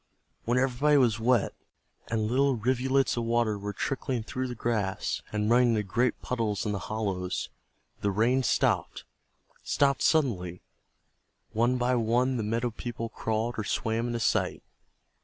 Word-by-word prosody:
When 120 Hz, +2 st, +1 dB
everybody 135 Hz, +3 st, +3 dB
was 120 Hz, -5 st, +3 dB
wet, 120 Hz, -1 st, +2 dB, 0.5 s
and 115 Hz, -2 st, -1 dB
little 135 Hz, +4 st, +2 dB
rivulets 130 Hz, +1 st, +1 dB
of 120 Hz, -, 0 dB
water 115 Hz, -2 st, +1 dB
were 100 Hz, 0 st, -4 dB
trickling 130 Hz, +2 st, -2 dB
through 130 Hz, +3 st, -3 dB
the 125 Hz, -, -5 dB
grass 110 Hz, -5 st, -1 dB
and 105 Hz, 0 st, -1 dB
running 120 Hz, +2 st, +5 dB
into 105 Hz, -, 0 dB
great 120 Hz, +6 st, 0 dB
puddles 115 Hz, -5 st, -1 dB
in 105 Hz, -, 0 dB
the 100 Hz, -, -2 dB
hollows, 95 Hz, -4 st, -2 dB, 0.5 s
the 100 Hz, -, 0 dB
rain 115 Hz, +6 st, +2 dB
stopped, 125 Hz, -, +1 dB, 0.6 s
stopped 140 Hz, -1 st, +2 dB
suddenly. 95 Hz, -, +1 dB, 0.9 s
One 120 Hz, +3 st, +2 dB
by 125 Hz, +1 st, +1 dB
one 125 Hz, +2 st, +2 dB
the -, -, -1 dB
meadow 115 Hz, +3 st, -1 dB
people 115 Hz, 0 st, -5 dB
crawled 110 Hz, +2 st, -2 dB
or -, -, -1 dB
swam 115 Hz, +3 st, -1 dB
into 120 Hz, -1 st, -2 dB
sight. -, -, 0 dB
115 Hz, 150 wpm, -28 LUFS, 110-125 Hz, 0.9 s, running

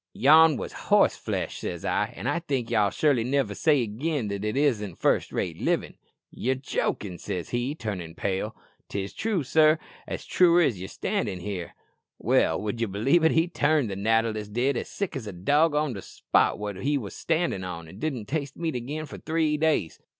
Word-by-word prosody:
'Yon 155 Hz, +3 st, +6 dB
wos -, -, -5 dB, 0.2 s
horse -, -, +5 dB
flesh,' -, -, -3 dB
says 85 Hz, -2 st, -5 dB
I; -, -, 0 dB
'an' -, -, -7 dB
I 170 Hz, -, +1 dB
think 135 Hz, -8 st, -3 dB
ye'll 105 Hz, -3 st, +3 dB
surely 135 Hz, -, +2 dB
niver 135 Hz, +2 st, 0 dB
say 145 Hz, -5 st, +3 dB
again 120 Hz, +2 st, -2 dB
that 100 Hz, 0 st, -4 dB
it 105 Hz, +4 st, -1 dB
isn't 110 Hz, -, +1 dB
first -, -, +1 dB
rate -, -, -3 dB
livin'.'" -, -, 0 dB, 0.4 s
"'Ye're 130 Hz, +2 st, -1 dB
jokin',' 105 Hz, -7 st, -3 dB
says 90 Hz, -3 st, -4 dB
he, 125 Hz, +4 st, -1 dB
turnin' 95 Hz, -, -5 dB
pale." 100 Hz, +4 st, -2 dB, 0.4 s
"'It's 100 Hz, 0 st, -3 dB
true, 210 Hz, -7 st, -1 dB
sir; 155 Hz, +3 st, +4 dB, 0.3 s
as -, -, -5 dB
true 175 Hz, -1 st, +5 dB
as 130 Hz, -, +2 dB
ye're 95 Hz, -, -5 dB
standin' 95 Hz, 0 st, -2 dB
there.'" 95 Hz, -4 st, -5 dB, 0.4 s
"Well, 80 Hz, -, +2 dB
would 105 Hz, +2 st, -3 dB
ye 115 Hz, -, +1 dB
believe 115 Hz, -, +2 dB
it, 160 Hz, -, +4 dB
he 165 Hz, +1 st, +3 dB
turned 150 Hz, -, +1 dB
that 95 Hz, -, -4 dB
natter 115 Hz, +2 st, +2 dB
list 105 Hz, -1 st, -6 dB
did 130 Hz, +4 st, +1 dB
as -, -, -3 dB
sick 200 Hz, -5 st, -4 dB
as 125 Hz, -5 st, -5 dB
a 100 Hz, -, -5 dB
dog 145 Hz, -, +2 dB
on 150 Hz, -3 st, +1 dB
the 100 Hz, -, -6 dB
spot -, -, +1 dB
wot 105 Hz, -2 st, -5 dB
he 145 Hz, +8 st, 0 dB
wos 105 Hz, -7 st, -6 dB
standin' 165 Hz, -, -1 dB
on, 85 Hz, -3 st, -6 dB
an' 95 Hz, +6 st, -12 dB
didn't 130 Hz, -8 st, -3 dB
taste 140 Hz, +1 st, -3 dB
meat 165 Hz, -2 st, -2 dB
again 145 Hz, +6 st, -4 dB
for -, -, -9 dB
three 160 Hz, -1 st, 0 dB
days!" 150 Hz, -, 0 dB
125 Hz, 200 wpm, -26 LUFS, 100-155 Hz, 0.4 s, Yon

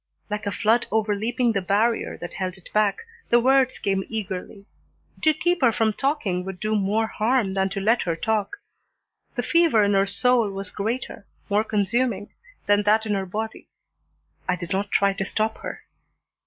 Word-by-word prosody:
Like 210 Hz, 0 st, -3 dB
a -, -, 0 dB
flood 225 Hz, +5 st, +2 dB
overleaping 220 Hz, +3 st, +1 dB
the 200 Hz, -3 st, 0 dB
barrier 210 Hz, +5 st, +1 dB
that 175 Hz, -, -6 dB
held 185 Hz, -1 st, -3 dB
it 190 Hz, -, -16 dB
back, 210 Hz, -2 st, +2 dB, 0.3 s
the 240 Hz, -, +5 dB
words 260 Hz, +1 st, +3 dB
came 195 Hz, -1 st, 0 dB
eagerly. 200 Hz, -1 st, -5 dB, 0.6 s
To 315 Hz, -, +5 dB
keep 345 Hz, +2 st, 0 dB
her 245 Hz, -3 st, +5 dB
from 220 Hz, -1 st, +1 dB
talking 230 Hz, -10 st, -1 dB
would 190 Hz, -1 st, -7 dB
do 215 Hz, +2 st, -1 dB
more 210 Hz, +2 st, +1 dB
harm 220 Hz, -2 st, 0 dB
than 190 Hz, 0 st, +1 dB
to 195 Hz, +1 st, -4 dB
let 225 Hz, +5 st, +2 dB
her 170 Hz, -2 st, -1 dB
talk. 215 Hz, -, -1 dB, 0.8 s
The -, -, -1 dB
fever 335 Hz, -11 st, +4 dB
in 205 Hz, 0 st, +2 dB
her 195 Hz, 0 st, +3 dB
soul 230 Hz, +2 st, +2 dB
was 195 Hz, -1 st, -6 dB
greater, 220 Hz, 0 st, -4 dB, 0.2 s
more 210 Hz, +2 st, +3 dB
consuming, 210 Hz, 0 st, 0 dB, 0.3 s
than 205 Hz, 0 st, +4 dB
that 215 Hz, +2 st, +3 dB
in 210 Hz, -, 0 dB
her 195 Hz, -1 st, -2 dB
body. 220 Hz, +4 st, -5 dB, 0.8 s
I 180 Hz, -, +3 dB
did 175 Hz, -1 st, -7 dB
not 195 Hz, +1 st, -1 dB
try 200 Hz, 0 st, +3 dB
to 195 Hz, 0 st, -3 dB
stop 220 Hz, +3 st, -1 dB
her. -, -, -7 dB
210 Hz, 180 wpm, -24 LUFS, 195-230 Hz, 0.8 s, the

